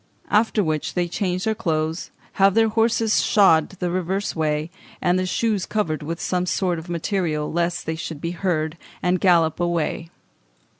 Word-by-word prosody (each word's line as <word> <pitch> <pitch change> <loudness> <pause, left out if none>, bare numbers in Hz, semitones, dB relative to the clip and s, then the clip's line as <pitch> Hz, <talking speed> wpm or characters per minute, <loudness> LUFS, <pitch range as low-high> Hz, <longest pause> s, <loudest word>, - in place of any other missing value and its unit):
after 215 0 +3
which 155 -3 -2
they 175 -1 +1
change 180 +1 -2
their 220 - +1
clothes, 160 -4 -2 0.3
have 195 0 +5
their 225 0 +4
horses 225 0 +2
shod 165 -7 +4
the 180 -2 -4
reverse 185 +3 -2
way, 155 0 -1 0.3
and 180 +1 +2
the 185 - -1
shoes 210 0 0
covered 165 -8 -1
with 165 +3 -4
some 180 0 -1
soft 175 -3 -1
material 170 -4 -1
lest 170 +1 -1
they 160 - -2
should 160 -1 -6
be 170 +2 -3
heard, 170 -3 -2 0.2
and 180 0 +1
gallop 170 -4 +3
away." 170 -1 -1
175 Hz, 160 wpm, -22 LUFS, 160-195 Hz, 0.3 s, have